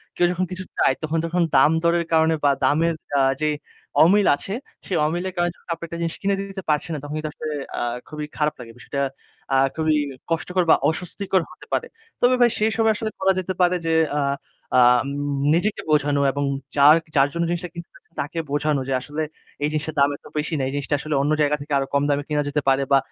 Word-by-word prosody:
কেউ 175 Hz, -, +3 dB
যখন 180 Hz, +1 st, -1 dB
কিছু 185 Hz, 0 st, -4 dB
চায় 130 Hz, -, +3 dB
তখন 155 Hz, +1 st, -1 dB
যখন 175 Hz, +2 st, 0 dB
দামদরের 170 Hz, +2 st, +4 dB
কারণে 160 Hz, 0 st, +4 dB
বা 145 Hz, -, +5 dB
দামের 165 Hz, +5 st, +2 dB, 0.3 s
আ -, -, +4 dB, 0.2 s
যে 155 Hz, -, +2 dB, 0.5 s
অমিল 200 Hz, +5 st, +5 dB
আছে, 190 Hz, +7 st, -6 dB, 0.3 s
সে -, -, -5 dB
অমিলের 175 Hz, +4 st, -2 dB
কারণে 175 Hz, 0 st, +1 dB
যখন -, -, -25 dB
আপনি 165 Hz, -, -9 dB
একটা 170 Hz, -, -6 dB
জিনিস 165 Hz, -1 st, -2 dB
কিনে 200 Hz, 0 st, +1 dB
দিতে 195 Hz, -1 st, -7 dB
পারছেন 150 Hz, +2 st, 0 dB
না -, -, -4 dB
তখন 145 Hz, 0 st, -6 dB
কিন্তু 155 Hz, 0 st, -3 dB
আসলে 155 Hz, -, -6 dB, 0.3 s
আ -, -, -2 dB, 0.3 s
খুবই 150 Hz, -1 st, -5 dB
খারাপ 150 Hz, 0 st, +1 dB
লাগে। 115 Hz, -2 st, -9 dB
বিষয়টা 140 Hz, +3 st, -4 dB, 0.5 s
আ -, -, +5 dB, 0.2 s
খুবই 155 Hz, -1 st, +2 dB, 0.4 s
কষ্টকর 180 Hz, +2 st, +1 dB
বা -, -, +8 dB
অস্বস্তিকর 185 Hz, +3 st, -1 dB
হতে -, -, -14 dB
পারে। -, -, 0 dB, 0.3 s
তবে 250 Hz, +1 st, +5 dB
ভাই, 240 Hz, -, +7 dB
সেই 215 Hz, +1 st, +2 dB
সময় 225 Hz, -1 st, +4 dB
আসলে 215 Hz, 0 st, -3 dB
করা 190 Hz, 0 st, +3 dB
যেতে 185 Hz, 0 st, -3 dB
পারে 180 Hz, 0 st, +4 dB
যে 165 Hz, -, +1 dB, 0.2 s
আ -, -, +2 dB, 0.6 s
আম 125 Hz, 0 st, +5 dB, 0.5 s
নিজেকে 200 Hz, +6 st, 0 dB
বোঝানো 145 Hz, -1 st, +2 dB
এবং 145 Hz, +1 st, -2 dB, 0.3 s
যার 145 Hz, +2 st, +8 dB, 0.2 s
যার 140 Hz, 0 st, +5 dB
জন্য 170 Hz, -, 0 dB
জিনিসটা 175 Hz, +1 st, -3 dB
কিনতেছেন 170 Hz, -1 st, -10 dB, 0.2 s
তাকে 145 Hz, +4 st, -4 dB
বোঝানো 145 Hz, -1 st, +1 dB
যে, 135 Hz, -, -1 dB
"আসলে 150 Hz, +4 st, -4 dB, 0.4 s
এই -, -, +3 dB
জিনিসটার 155 Hz, 0 st, -3 dB
দাম 140 Hz, 0 st, +5 dB
এত -, -, -31 dB
বেশি 150 Hz, +2 st, -1 dB
না। 135 Hz, -, -1 dB
এই -, -, -3 dB
জিনিসটা 145 Hz, 0 st, -1 dB
আসলে 155 Hz, +1 st, -2 dB
অন্য 145 Hz, +2 st, +1 dB
জায়গা 150 Hz, 0 st, +3 dB
থেকে 145 Hz, +1 st, -5 dB
আরও 135 Hz, -, -1 dB
কম 140 Hz, 0 st, +3 dB
দামে 145 Hz, 0 st, +1 dB
কিনা 150 Hz, -1 st, +1 dB
যেতে 150 Hz, +1 st, 0 dB
পারে 135 Hz, +1 st, +3 dB
বা 140 Hz, -, +7 dB
155 Hz, 215 wpm, -23 LUFS, 145-175 Hz, 0.6 s, বা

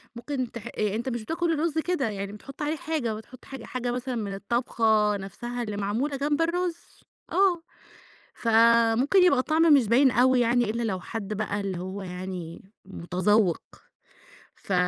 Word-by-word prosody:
ممكن 250 Hz, 0 st, -4 dB
تح 235 Hz, 0 st, -8 dB
أ 210 Hz, -3 st, -2 dB
أنت 235 Hz, +4 st, -2 dB
مش 240 Hz, -2 st, -3 dB
بتاكل 330 Hz, +6 st, -1 dB
الرز 320 Hz, 0 st, -1 dB
كده، 320 Hz, -6 st, 0 dB
يعني 200 Hz, -1 st, -5 dB
بتحط 275 Hz, +8 st, -11 dB
عليه 300 Hz, +2 st, 0 dB
حاجة 300 Hz, -8 st, -2 dB
بتحط 220 Hz, +4 st, -11 dB
حاجة 270 Hz, -4 st, -9 dB
حاجة 250 Hz, -1 st, -3 dB
مثلًا 250 Hz, +1 st, -3 dB
من 205 Hz, -4 st, -3 dB
الطبخة 215 Hz, -1 st, +1 dB
نفْسها 240 Hz, +6 st, -5 dB
اللي 210 Hz, -3 st, -5 dB
معمولة 230 Hz, +8 st, -1 dB
جنب 290 Hz, +2 st, 0 dB
الرز، 340 Hz, +1 st, 0 dB, 0.5 s
آه، 375 Hz, -3 st, +3 dB, 0.7 s
فممكن 230 Hz, -, +4 dB
يبقى 320 Hz, -7 st, +4 dB
الطعم 315 Hz, +4 st, +3 dB
مش 255 Hz, -7 st, +3 dB
باين 255 Hz, +4 st, +5 dB
أوي 255 Hz, +1 st, +4 dB
يعني 240 Hz, +1 st, +3 dB
إلّا 230 Hz, +2 st, -2 dB
لو 195 Hz, -5 st, -2 dB
حد 215 Hz, +1 st, -5 dB
بقى 205 Hz, -1 st, -2 dB
اللي 190 Hz, -3 st, -3 dB
هو 190 Hz, +2 st, -6 dB
يعني 180 Hz, -2 st, -7 dB, 0.2 s
متذوّق، 185 Hz, +1 st, +1 dB, 0.9 s
ف 195 Hz, -, -6 dB
235 Hz, 160 wpm, -26 LUFS, 205-280 Hz, 0.9 s, باين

